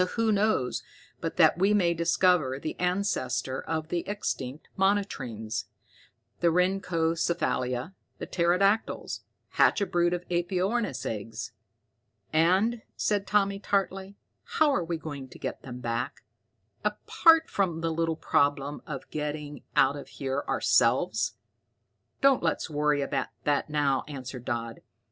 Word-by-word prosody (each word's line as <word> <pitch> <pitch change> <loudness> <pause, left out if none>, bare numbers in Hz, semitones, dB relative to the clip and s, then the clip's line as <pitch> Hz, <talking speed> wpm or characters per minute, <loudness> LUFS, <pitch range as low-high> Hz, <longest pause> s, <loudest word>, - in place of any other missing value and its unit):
Who 230 -1 +2
knows 205 -11 +1 0.4
but - - -4
that - - +5
we 200 +3 +4
may 175 -4 +3
discover 170 -4 +2
the 155 - -4
ancestor 135 -9 -1
of 160 -1 -3
the 175 - 0
extinct 145 -9 -4
monotremes, 125 - -1 0.7
the 175 - +2
rhynchocephalia, 165 -6 0 0.2
the - - -5
pterodactyls, 185 +5 +1 0.3
hatch - - +4
a 200 - +1
brood 175 -1 +1
of 175 0 -7
aepyornis 180 - 0
eggs 110 0 -4 0.4
" 110 -3 -44
"And," 190 +9 +3
said 205 -2 0
Tommy 200 -1 +2
tartly, 195 -1 -1 0.3
"how 305 -2 +2
are 180 - +1
we 165 0 -2
going 145 -4 -7
to - - -13
get - - -5
them 125 -1 -8
back, 120 +3 -3 0.6
apart 325 -1 +4
from 175 -5 -1
the 165 0 0
little 165 0 0
problem 145 -1 +1
of 140 -4 -6
getting 150 -2 -4
out 135 +1 +4
of 145 - -8
here 135 0 -3
ourselves?" - - +2 0.9
"Don't 275 -2 +5
let's 165 -1 -1
worry 150 -1 +2
about 140 0 -1 0.2
that 145 0 +1
now," 145 -3 +1
answered 130 -4 -7
Dodd. 115 -1 -3
165 Hz, 130 wpm, -28 LUFS, 135-190 Hz, 0.9 s, that